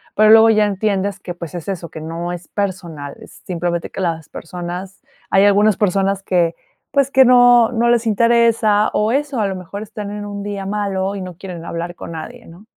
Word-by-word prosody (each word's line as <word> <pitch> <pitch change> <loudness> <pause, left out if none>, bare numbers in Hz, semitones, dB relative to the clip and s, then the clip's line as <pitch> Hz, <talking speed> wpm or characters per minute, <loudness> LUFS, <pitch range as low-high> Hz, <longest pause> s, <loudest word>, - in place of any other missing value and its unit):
Pero 215 +1 +5
luego 225 0 +8
ya 215 -1 +4
entiendes 200 -1 -1
que, 180 -2 -6
pues, 170 0 -8
es 170 - -7
eso, 180 -4 -4
que - - -9
no 165 +2 -5
es 175 -1 -7
personal, 170 -8 -5
es - - -15
simplemente 170 -1 -2
que - - -7
las 165 -4 -2
personas, 180 +3 -7 0.3
hay 195 - +4
algunas 205 +1 +4
personas 195 -1 0
que, 175 -3 +1 0.4
pues, 275 -1 +1
que 265 -1 +6
no 245 -1 +6
no 235 0 +2
les 235 -1 +2
interesa 225 -1 +3
o 210 +1 +1
eso, 275 -2 -1
a 205 - +1
lo 190 -1 -4
mejor 185 +3 -8
están 210 -1 -7
en 205 0 -6
un 205 0 -6
día 200 -1 -5
malo 200 -1 -2
y - - -5
no 185 -1 -7
quieren 175 -2 -8
hablar 170 +1 -5
con 170 - -8
nadie, 235 +9 -8
¿no? 175 +6 -15
195 Hz, 205 wpm, -18 LUFS, 175-215 Hz, 0.4 s, luego